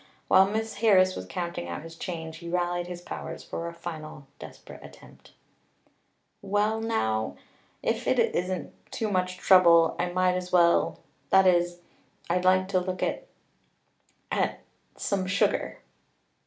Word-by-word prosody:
While 190 - +6
Miss 220 +1 -3
Harris 190 -4 +4
was - - -7
counting 170 - -4
out 85 - -5
his 165 0 -10
change 160 -2 -6
he 170 0 -8
rallied 175 0 -1
his 175 -1 -7
powers - - -7
for 170 - -5
a 170 - -6
final 155 -3 -8
desperate - - -12
attempt. - - -16 1.1
"Well 205 +2 0
now 110 - -1 0.5
if - - -1
it - - +2
isn't 180 0 -1 0.2
too 220 -2 -2
much 185 -1 -1
trouble 170 -3 +5
I 180 - 0
might 185 0 +2
as 180 0 -4
well 170 -1 +3 0.3
that 190 0 +5
is 175 -1 +2 0.5
I'd 180 +1 0
like 185 0 +4
to 185 - +2
look 185 0 -3
at - - -2 1.0
at - - -1 0.4
some 195 -2 -1
sugar." 200 +1 0
180 Hz, 140 wpm, -27 LUFS, 170-185 Hz, 1.1 s, While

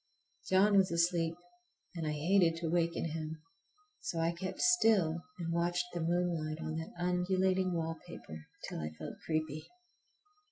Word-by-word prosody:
John 200 +2 +5
was 190 -2 +4
asleep 170 -1 +2 0.6
and 165 -3 -3
I 150 - 0
hated 165 +2 +3
to 165 -1 -2
waken 170 -1 +1
him, 155 0 -5 0.6
so 170 - -4
I 165 +1 +2
kept 185 +2 -5
still 215 - +4 0.2
and 165 -1 -2
watched 175 +1 +1
the 175 - -2
moonlight 165 -2 0
on 160 0 -3
that 160 0 -5
undulating 185 +1 +1
wallpaper 165 - -5 0.2
till - - -5
I 75 -1 -3
felt - - -7
creepy. 155 -1 -2
170 Hz, 145 wpm, -33 LUFS, 160-180 Hz, 0.6 s, John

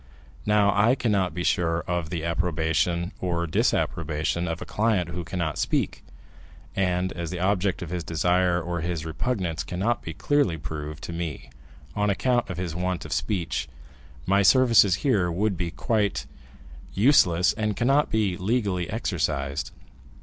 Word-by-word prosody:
Now 105 -1 +4
I 110 +5 +4
cannot 100 -8 +1
be 85 - -2
sure 85 -1 +1
of 85 -3 -3
the 85 -2 -3
approbation 85 +1 0
or 85 -2 -1
disapprobation 80 +1 0
of 80 0 -3
a - - -6
client 105 -6 0
who 85 +1 -4
cannot 85 -2 -3
speak, - - -1 0.7
and 90 -1 0
as 85 -2 -4
the 90 - -4
object 95 -1 0
of 85 - -7
his 90 -2 -3
desire 90 +2 +1
or 85 0 -3
his 85 -2 -3
repugnance 80 - -2
cannot 95 - -1
be 80 - -7
clearly 145 - +1
proved 75 0 -6
to 85 - -5
me, 85 -7 -5 0.4
on 105 0 +1
account 120 +4 +1
of 95 - -5
his 90 -3 -3
want 90 0 -2
of - - -4
speech, 90 -10 -2 0.6
my 100 +2 +3
services 105 -2 +6
here 100 -10 +2
would 100 +3 0
be 85 -1 -2
quite 100 - -1 0.7
useless, 95 - +4
and 105 -2 -2
cannot 135 +5 +3
be 105 -5 +1
legally 95 -4 -1
exercised." 70 - -2
90 Hz, 150 wpm, -25 LUFS, 85-100 Hz, 0.7 s, services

